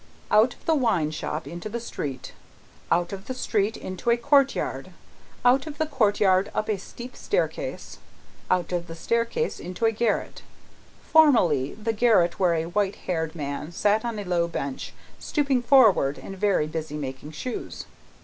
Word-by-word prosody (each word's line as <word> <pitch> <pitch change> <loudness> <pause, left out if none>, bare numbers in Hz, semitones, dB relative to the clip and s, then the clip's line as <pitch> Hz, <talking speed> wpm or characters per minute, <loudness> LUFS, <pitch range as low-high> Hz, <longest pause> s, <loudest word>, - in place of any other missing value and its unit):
Out 225 +4 +4
of - - -26
the 325 - +3
wine 215 - +1
shop 155 0 -4
into 175 +5 -6
the 235 +3 -3
street, 140 - -6 0.6
out 175 +2 +1
of 195 +1 -8
the 260 - -4
street 220 -3 0
into 185 +5 -4
a 235 - +4
courtyard, 275 +3 +1 0.6
out 260 +4 +4
of 295 -1 -7
the 315 - +1
courtyard 205 -8 +2
up 215 - -1
a 210 -3 0
steep 240 +6 -10
staircase, - - -3 0.5
out 180 -2 +1
of 175 -1 -2
the 165 - -8
staircase 235 - -1
into 180 +6 -3
a 225 - +4
garret 225 -1 -1 0.6
formerly 185 - +4
the 220 +1 -2
garret 210 -7 +3
where 180 -3 +3
a 160 0 -1
white 195 +3 0
haired 160 -2 -2
man 145 +1 -5
sat 210 +5 +1
on 235 -2 -3
a 205 - -4
low 175 -2 0
bench, 140 -5 -5 0.3
stooping 280 -4 0
forward 225 - +5
and 195 - -8
very 195 -5 +2
busy, 155 -1 -5
making 135 0 -6
shoes. 225 +11 -6
205 Hz, 165 wpm, -25 LUFS, 170-235 Hz, 0.6 s, forward